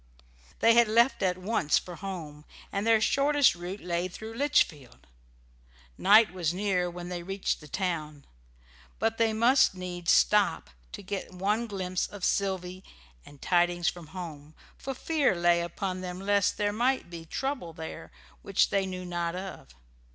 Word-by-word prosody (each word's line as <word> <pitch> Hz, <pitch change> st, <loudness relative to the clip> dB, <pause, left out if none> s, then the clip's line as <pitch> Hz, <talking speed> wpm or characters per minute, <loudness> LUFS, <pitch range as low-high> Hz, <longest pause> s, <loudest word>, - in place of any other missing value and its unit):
They 230 Hz, -, +6 dB
had 235 Hz, 0 st, +5 dB
left 235 Hz, +4 st, +3 dB
at 185 Hz, -2 st, +1 dB
once 185 Hz, -5 st, +1 dB
for 175 Hz, -2 st, -6 dB
home, 160 Hz, -6 st, -7 dB, 0.3 s
and 200 Hz, +2 st, -2 dB
their 225 Hz, -1 st, +5 dB
shortest 280 Hz, +5 st, +3 dB
route 175 Hz, +3 st, -7 dB
lay 175 Hz, 0 st, -1 dB
through 220 Hz, +5 st, -9 dB
Litchfield. 225 Hz, -, 0 dB, 0.9 s
Night 215 Hz, -, +6 dB
was 175 Hz, -2 st, -1 dB
near 185 Hz, -2 st, 0 dB
when 175 Hz, 0 st, -8 dB
they 175 Hz, -1 st, -4 dB
reached 195 Hz, +1 st, -2 dB
the 150 Hz, -, -12 dB
town, 155 Hz, -4 st, -3 dB, 0.7 s
but 225 Hz, +2 st, -1 dB
they 225 Hz, -1 st, +3 dB
must 235 Hz, 0 st, +4 dB
needs 180 Hz, -2 st, -5 dB
stop -, -, +3 dB, 0.2 s
to -, -, -7 dB
get 195 Hz, 0 st, -5 dB
one 210 Hz, +5 st, 0 dB
glimpse 185 Hz, -3 st, -2 dB
of 200 Hz, -3 st, -5 dB
Sylvy 185 Hz, -1 st, -1 dB, 0.4 s
and 145 Hz, -1 st, -14 dB
tidings 175 Hz, -1 st, +2 dB
from 175 Hz, -3 st, -9 dB
home, 155 Hz, -3 st, -9 dB, 0.2 s
for 270 Hz, 0 st, -6 dB
fear 290 Hz, -, +1 dB
lay 170 Hz, 0 st, +3 dB
upon 185 Hz, +2 st, -4 dB
them 180 Hz, 0 st, -6 dB
lest 200 Hz, 0 st, +1 dB
there 205 Hz, -1 st, 0 dB
might 245 Hz, -4 st, 0 dB
be 170 Hz, -1 st, -7 dB
trouble 255 Hz, -, -4 dB
there 160 Hz, 0 st, -8 dB, 0.3 s
which 195 Hz, -, +1 dB
they 195 Hz, -1 st, +1 dB
knew 185 Hz, -1 st, -6 dB
not 175 Hz, -1 st, -2 dB
of. 185 Hz, -, -8 dB
185 Hz, 160 wpm, -28 LUFS, 175-210 Hz, 0.9 s, They